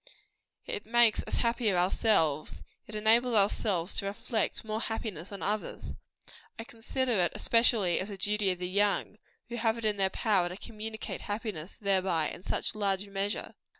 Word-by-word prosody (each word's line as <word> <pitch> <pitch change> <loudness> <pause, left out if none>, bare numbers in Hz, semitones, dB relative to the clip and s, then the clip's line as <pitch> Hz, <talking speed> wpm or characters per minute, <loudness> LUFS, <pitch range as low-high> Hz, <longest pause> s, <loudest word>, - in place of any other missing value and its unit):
It - - -4
makes 235 -2 +4
us - - -2
happier 230 -5 +1
ourselves; 175 -5 +1 0.2
it 215 - -7
enables 230 +3 +3 0.3
us 185 -4 0
to - - -4
reflect 215 +2 -2
more 215 0 -2
happiness 210 -7 -4
on 200 - -6
others. 210 +1 -2 0.6
I 225 - -5
consider 245 +3 -2
it 175 -1 +2
especially 230 -6 +3
as 195 - -3
a 200 - -6
duty 205 +1 +1
of 180 - 0
the 180 0 -3
young, 205 +2 +1 0.3
who 240 - -4
have 225 -1 +1
it 230 - -5
in 210 -1 +1
their 190 -1 +2
power 190 -4 +1
to 180 - -7
communicate 220 0 -6
happiness 205 -5 -4
thereby 185 -6 +1
in - - -9
such - - 0
large 200 -2 0
measure. 200 +1 -3
210 Hz, 165 wpm, -30 LUFS, 190-225 Hz, 0.6 s, makes